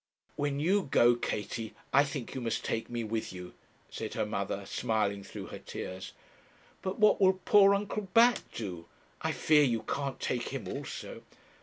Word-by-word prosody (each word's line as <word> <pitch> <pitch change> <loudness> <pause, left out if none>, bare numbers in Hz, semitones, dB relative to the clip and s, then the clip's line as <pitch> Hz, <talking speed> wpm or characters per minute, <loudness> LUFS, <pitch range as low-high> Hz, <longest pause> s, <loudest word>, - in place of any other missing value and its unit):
'When 145 -1 -1
you 185 +4 +2
go, 120 -1 +6
Katie, 115 -1 -4 0.2
I 140 - +7
think 140 -4 -5
you 130 - -4
must 115 -2 -2
take 115 - -2
me 120 -1 -3
with 110 0 -3
you,' 90 -1 -9 0.4
said - - -5
her - - 0
mother, - - -3
smiling 105 -3 -1
through - - -8
her - - -6
tears. 95 +1 -7 0.7
'But 190 0 -3
what 215 -1 +5
will 190 -1 +5
poor 200 -1 +7
Uncle 205 0 -3
Bat 235 +4 +6
do? 90 -7 -6 0.3
I - - 0
fear 155 -1 +4
you 120 -5 +1
can't 140 -2 -3
take 120 -2 -2
him - - -5
also.' - - -6
125 Hz, 170 wpm, -31 LUFS, -, 0.7 s, I